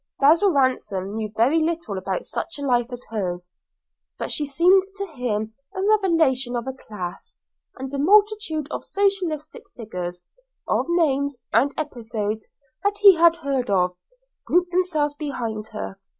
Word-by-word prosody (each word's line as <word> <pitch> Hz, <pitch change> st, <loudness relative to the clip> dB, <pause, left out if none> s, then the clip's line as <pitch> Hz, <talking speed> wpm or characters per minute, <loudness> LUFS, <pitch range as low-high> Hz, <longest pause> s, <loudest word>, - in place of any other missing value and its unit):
Basil 325 Hz, +8 st, +5 dB
Ransom 235 Hz, -, 0 dB
knew 215 Hz, -1 st, -3 dB
very 270 Hz, +9 st, +4 dB
little 325 Hz, -9 st, -2 dB
about 190 Hz, 0 st, -3 dB
such 335 Hz, -, -5 dB
a 285 Hz, -, -6 dB
life 245 Hz, -3 st, +2 dB
as 245 Hz, -1 st, -7 dB
hers, 180 Hz, -4 st, -3 dB, 0.7 s
but -, -, -4 dB
she 295 Hz, -, -1 dB
seemed 350 Hz, +7 st, +5 dB
to 395 Hz, 0 st, -3 dB
him 230 Hz, -, -3 dB, 0.2 s
a 380 Hz, -, -2 dB
revelation 325 Hz, -, +2 dB
of 240 Hz, 0 st, -2 dB
a 265 Hz, -, -4 dB
class, 195 Hz, -8 st, -8 dB, 0.4 s
and 265 Hz, +1 st, -6 dB
a 280 Hz, -, -2 dB
multitude 405 Hz, -3 st, +3 dB
of -, -, -4 dB
socialistic 390 Hz, 0 st, -1 dB, 0.2 s
figures, 180 Hz, -6 st, -5 dB, 0.5 s
of -, -, +1 dB
names 285 Hz, -5 st, +1 dB, 0.2 s
and 280 Hz, -, +4 dB
episodes 225 Hz, -7 st, -3 dB, 0.3 s
that 405 Hz, 0 st, +1 dB
he 405 Hz, -2 st, +9 dB
had 335 Hz, -1 st, +5 dB
heard 275 Hz, -7 st, -2 dB
of, 180 Hz, -2 st, +2 dB, 0.5 s
grouped 355 Hz, 0 st, +2 dB
themselves 335 Hz, -5 st, +1 dB
behind 240 Hz, -8 st, -4 dB
her. 210 Hz, -3 st, -7 dB
275 Hz, 150 wpm, -23 LUFS, 220-335 Hz, 0.7 s, he